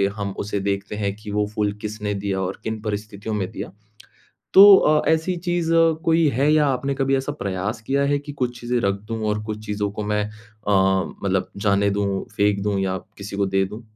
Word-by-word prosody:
हम 100 -2 -3
उसे 100 0 -2
देखते 100 +1 -2
हैं 100 -1 -1
कि 105 0 -9
वो 105 0 +1
फूल 105 -1 0
किसने 105 -1 -3
दिया 100 -1 -2
और 95 +1 -3
किन 110 0 -3
परिस्थितियों 105 0 -4
में 95 -3 -2
दिया। - - -6 0.8
तो 195 +1 +11
अ, 150 -3 +3
ऐसी 160 +3 +1
चीज़ 175 -1 -1 0.3
कोई 165 0 +4
है 140 +5 +3
या 155 -1 +4
आपने 135 +1 0
कभी 135 0 +1
ऐसा 135 +2 -2
प्रयास 100 -3 -3
किया 135 +5 0
है 145 - +2
कि 145 0 -8
कुछ 125 -3 -3
चीज़ें 120 0 -1
रख 100 -2 +1
दूँ 115 -1 -3
और 105 0 -1
कुछ 110 0 -6
चीज़ 105 0 -3
को 105 - -3
मैं 105 0 0
अ, 110 -1 -7 0.5
मतलब 95 -1 0
जाने 100 0 +2
दूँ, 100 -1 -1
फेंक 100 0 +2
दूँ, 100 -1 0
या 95 -1 -1 0.2
किसी 100 0 -6
को 100 - +1
दे 95 0 +1
दूँ? 105 +4 -9
105 Hz, 205 wpm, -22 LUFS, 100-130 Hz, 0.8 s, तो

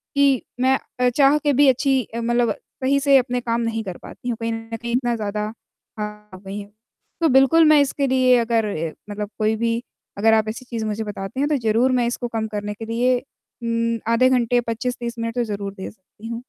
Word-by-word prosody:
कि 280 -3 +4 0.2
मैं 265 +1 +4 0.2
अ, 250 0 +4
चाह 280 +3 +4
के 295 -2 +1
भी 285 +2 +5
अच्छी 265 +1 +2
अ, 235 - -2
मतलब 240 -1 +1 0.3
सही 275 +2 +3
से 280 -1 +5
अपने 250 -1 0
काम 235 0 -1
नहीं 225 -1 -2
कर 185 -4 -6
पाती 245 - -9
हूँ। 230 - -2
कहीं 230 0 -1
न 225 0 -6
कहीं 235 0 -4
इतना 240 -2 +1
ज़्यादा 210 -1 -3 0.6
आ 210 - -1 0.3
गई 195 +2 -7
हैं 200 0 -9 0.5
तो 325 - +4
बिल्कुल 270 +5 +5
मैं 295 - +6
इसके 280 0 0
लिए 255 -1 +4
अगर 230 -1 +1
ए 160 -3 -3 0.2
मतलब 205 0 -4
कोई 215 0 +2
भी 230 +1 0 0.4
अगर 225 +2 +4
आप 220 -1 +3
ऐसी 250 +3 -7
चीज़ 230 -3 -4
मुझे 215 +1 -2
बताते 205 +3 -6
हैं 290 +2 +1
तो 295 - +2
ज़रूर 235 +4 +3
मैं 240 - +2
इसको 240 0 -3
कम 220 - -1
करने 210 -1 -4
के 225 +2 -8
लिए 245 +3 +2 0.5
उम, 230 0 0
आधे 255 +2 +4
घंटे, 245 -1 +2
25-30 235 0 -4
मिनट 230 +1 -3
तो 245 - +1
ज़रूर 200 -2 -4
दे 190 -2 -7
सकती 210 +2 -14
हूँ। 230 0 -4
235 Hz, 220 wpm, -22 LUFS, 220-255 Hz, 0.6 s, मैं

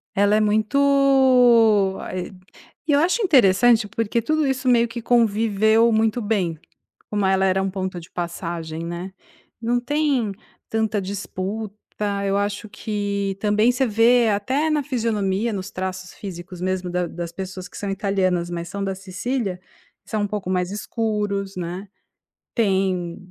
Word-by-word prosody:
Ela 205 +1 +4
é - - +4
muito, 240 -3 +4
ah - - -6
ê 180 +1 -4 0.5
e 305 - 0
eu 285 - +5
acho 365 +8 +2
interessante 240 - +4
porque 230 +2 -1
tudo 310 +5 +1
isso 265 -1 -1
meio 235 -1 +4
que 235 0 -6
conviveu 220 -1 +3
muito 220 +2 +1
bem, 185 -7 -1 0.5
como 205 -2 0
ela 190 0 +3
era 190 0 +2
um 195 - -1
ponto 185 -1 -4
de 165 - -14
passagem, 170 -2 -4
né. 175 +3 -6 0.5
Não 240 +1 +1
tem 265 -5 0 0.4
tanta 220 -2 0
disputa, 200 +2 -4 0.5
eu 195 0 +1
acho 205 +1 -2
que 200 -3 -3
também 210 +3 +3
você 255 0 0
vê 230 +2 +4
até 260 +10 0
na 300 -2 +1
fisionomia, 225 -4 -1
nos 190 0 -5
traços 185 0 -5
físicos 180 -2 -8
mesmo 185 -1 -1
da 180 0 -1
das 170 0 -6
pessoas 185 0 -7
que - - -11
são 200 - -4
italianas, 190 -3 0
mas 170 0 -4
são 200 +3 -4
da 195 -1 -1
Cecília, 190 +1 -3 0.5
são 215 -2 -2
um - - 0
pouco 200 -3 -4
mais 180 -1 0
escuros, 205 -2 -2
né, 180 +3 -5 0.7
tem 190 -5 0
205 Hz, 150 wpm, -22 LUFS, 185-230 Hz, 0.7 s, eu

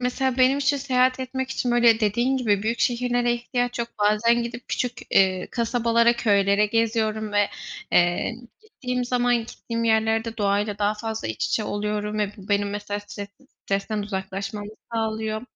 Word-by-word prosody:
Mesela 250 +1 0
benim 260 +2 +4
için, 285 0 +2
seyahat 255 -1 +1
etmek 260 0 -4
için 250 -2 -1
böyle 240 -2 +5
dediğin 240 +5 +1
gibi 210 -6 +1
büyük 230 +2 -1
şehirlere 245 0 +1
ihtiyaç 245 0 -2
yok. 235 0 -2
Bazen 215 +3 +3
gidip 240 +1 -7
küçük, 250 -1 -1 0.2
eee, 185 -1 +3
kasabalara, 235 0 +2
köylere 200 -2 +3
geziyorum 220 -1 0
ve, 205 -1 +3 0.4
eee, 175 +6 +2 0.3
gittiğim 250 - -4
zaman 245 0 +2
gittiğim 230 0 -4
yerlerde 225 0 +1
doğayla 205 0 0
daha 205 0 +1
fazla 220 - -4
iç 110 - -3
içe 220 - 0
oluyorum 210 0 -2
ve 210 -1 0
bu 195 -2 -13
benim 205 0 +1
mesela 205 0 -4
stres 205 0 -8 0.4
stresten 200 +2 -1
uzaklaşmamı 200 +1 -5 0.2
sağlıyor. 220 -1 -2
225 Hz, 155 wpm, -24 LUFS, 205-245 Hz, 0.4 s, böyle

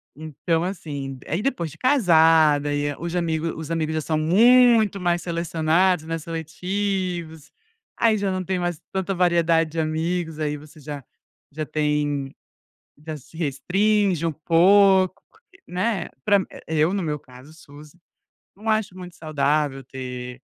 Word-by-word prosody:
Então, 160 +2 -2
assim 145 -8 -5
aí 170 +6 -1
depois 235 -12 -1
de - - -14
casada 160 - +4
e 145 0 -1
aí 145 - -4
os 170 +1 -5
amigo 165 -2 -1
os 160 - -7
amigos 160 -1 -1
já 155 - -1
são 155 +1 -1
muito 220 +5 +5
mais 175 -1 0
selecionados, 170 +1 +1
né, 165 0 -3
seletivos. 170 0 -4 0.5
Aí, 225 -2 +4
já 200 -1 -1
não 185 0 -2
tem 185 +1 -2
mais 175 -3 -2
tanta 190 0 -1
variedade 170 -2 +2
de 165 - -3
amigos, 160 +1 -2
aí 150 -1 -1
você 150 +1 -13
já 145 -1 -7 0.5
já 155 +1 -4
tem 145 -2 -1 0.7
já 155 -1 -4
se 150 +3 -14
restringe 180 +4 +1
um 165 - +1
pouco, 185 +4 +4 0.5
né? 185 0 -1 0.2
Pra 200 -1 +4
mim 190 - -3 0.2
eu, 160 +2 +1
no 195 - -1
meu 150 -2 -2
caso, 130 +3 -15
suz 150 0 -15 0.6
não 215 +2 -7
acho 215 -3 0
muito 180 -1 -10
saudável 145 -2 0
ter, 125 -1 -7
165 Hz, 150 wpm, -23 LUFS, 150-185 Hz, 0.7 s, muito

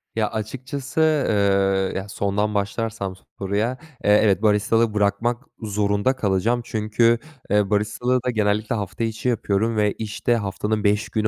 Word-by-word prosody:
Ya, 110 -1 +1
açıkçası, 130 +6 -5 0.3
eee, 100 -2 +2
ya, 95 - -7
sondan 105 +1 -1
başlarsam 100 -1 -2 0.2
soruya, 105 +6 -1 0.3
eee, 105 +1 +5
evet 100 -2 +3
baristalığı 110 +1 +2
bırakmak 105 +4 0 0.2
zorunda 105 +3 0
kalacağım. 110 +1 +1
Çünkü, 115 +1 +2 0.3
eee, 105 -1 +2
baristalığı 105 +5 +1
da 125 - 0
genellikle 105 0 0
hafta 105 +2 -3
içi 115 +2 -1
yapıyorum 110 -1 0
ve 105 -1 +3
işte 110 +2 -1
haftanın 105 0 -2
5 105 0 +1
günü 110 -1 0
105 Hz, 140 wpm, -23 LUFS, 100-115 Hz, 0.3 s, eee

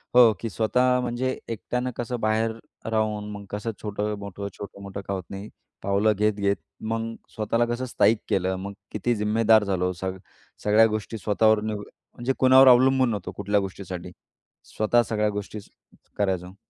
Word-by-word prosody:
हो. 120 -3 +8
की 115 - -3
स्वतः 125 +4 +2
म्हणजे 125 +2 -2
एकट्यानं 125 +3 -3
कसं 120 0 -3
बाहेर 110 +1 +1 0.4
राहून 105 -1 0
मग 100 -1 -8
कसं 105 +2 -3
छोटं-मोठं, 100 -1 -4
छोटं-मोठं 100 -1 -7
का 100 - -1
होत 95 -2 -3
नाही, 100 +2 -7 0.3
पावलं 100 +2 +3
घेत-घेत 100 -1 +1 0.4
मग 115 0 -2 0.2
स्वतःला 115 +2 +1
कसं 120 +2 -2
स्थाईक 115 -2 +3
केलं. 95 0 +1
मग 100 +2 -6 0.2
किती 120 +3 0
जिम्मेदार 110 +1 +4
झालो? 90 -2 0
सग 95 0 -3 0.5
सगळ्या 105 +2 +6
गोष्टी 110 +1 -5
स्वतःवर 110 +1 +3
निवड 105 -1 -3 0.3
म्हणजे 125 +2 -1
कुणावर 130 +1 +7
अवलंबून 130 0 +6
नव्हतो 100 -4 -4
कुठल्या 105 +1 +1
गोष्टीसाठी, 90 -2 -6 0.5
स्वतः 115 +3 +2
सगळ्या 105 -1 0
गोष्टी 105 +1 -5 0.6
करायचो. 95 -2 -1
105 Hz, 145 wpm, -25 LUFS, 100-115 Hz, 0.6 s, हो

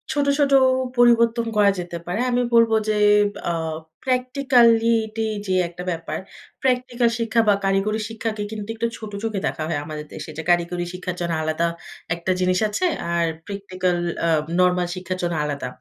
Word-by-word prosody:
ছোট, 290 -1 0
ছোট 280 -1 +3 0.5
পরিবর্তন 235 -1 +4
করা 205 -1 +5
যেতে 175 -1 -5
পারে। 180 +5 -3
আমি 245 0 +2
বলব 230 -1 +5 0.2
যে, 215 - +2 0.5
আ - - +1 0.5
practicality 235 -4 +3 0.2
যে 190 - 0 0.2
একটা 175 +1 -8
ব্যাপার, 165 -1 -4 0.4
প্র্যাকটিক্যাল 250 -2 +1
শিক্ষা 230 0 +2
বা 205 - +6
কারিগরি 195 +3 +1
শিক্ষাকে 225 -1 -3
কিন্তু 210 -1 -6
একটু 230 +1 -1
ছোট 215 -2 -8
চোখে 220 -3 -1
দেখা 155 - -3
হয় 160 -3 -1
আমাদের 150 -1 -6
দেশে - - -7
যে, 160 - -4
কারিগরি 175 0 +1
শিক্ষার 180 0 -5
জন্য 170 -1 -1
আলাদা 155 +2 0 0.5
একটা 170 +2 -2
জিনিস 185 0 +2
আছে। 210 - -1 0.3
আর 170 0 +2 0.2
প্র্যাকটিক্যাল 185 -3 -2 0.3
আ - - +2 0.3
নরমাল 180 -1 +3
শিক্ষার 185 0 -4
জন্য 175 0 0
আলাদা। 145 -3 -3
205 Hz, 160 wpm, -22 LUFS, 175-230 Hz, 0.5 s, বা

